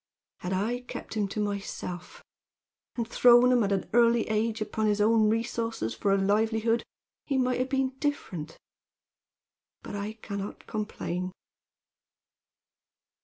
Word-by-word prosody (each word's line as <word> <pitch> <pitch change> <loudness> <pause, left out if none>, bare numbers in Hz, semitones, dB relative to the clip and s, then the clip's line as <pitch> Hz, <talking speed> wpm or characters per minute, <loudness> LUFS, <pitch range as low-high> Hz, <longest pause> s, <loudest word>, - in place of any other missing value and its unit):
Had 180 - -4
I 210 +6 0
kept 245 - -8
him 210 -2 0
to 200 - -5
myself 200 -3 -4 0.7
and 235 -2 -2
thrown 245 +1 +6
him 245 -1 +4
at 200 - 0
an 195 -1 0
early 235 -1 +4
age 220 +1 0
upon 220 0 -1
his 210 0 +2
own 215 0 +4
resources 230 - -1
for 195 - 0
a 195 - +4
livelihood, 220 +3 +2 0.4
he 275 - +1
might 250 -1 +1
have 255 +1 0
been 270 -1 +1
different. 180 - -3 1.3
But - - -6
I 205 +2 -3
can 205 -2 -6
not 200 - -7
complain. 185 -4 -3
220 Hz, 135 wpm, -28 LUFS, 200-235 Hz, 1.3 s, thrown